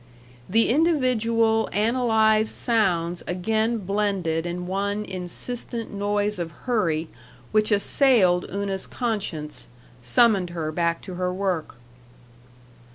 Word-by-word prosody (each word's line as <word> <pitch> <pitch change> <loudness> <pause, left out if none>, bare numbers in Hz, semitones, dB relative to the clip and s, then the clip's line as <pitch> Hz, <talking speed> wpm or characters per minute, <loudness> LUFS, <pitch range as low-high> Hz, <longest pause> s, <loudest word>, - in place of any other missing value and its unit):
The 225 +4 +3
individual, 230 -7 +2
analyzed 220 -1 +2
sounds 180 -7 0
again 220 +6 0
blended 195 -5 -1
in 175 +1 -4
one 200 +3 -2
insistent 225 +6 -5
noise 205 0 -1
of 170 -1 -3 0.2
hurry 170 -10 0 0.4
which 215 0 +2
assailed 200 -4 +3
Una's 195 -1 -3
conscience, 190 - -3 0.3
summoned 190 - +3
her 165 -3 -3
back 170 +1 -1
to 185 - -7
her 180 0 0
work. 185 -6 -2
200 Hz, 100 wpm, -24 LUFS, 180-225 Hz, 0.4 s, The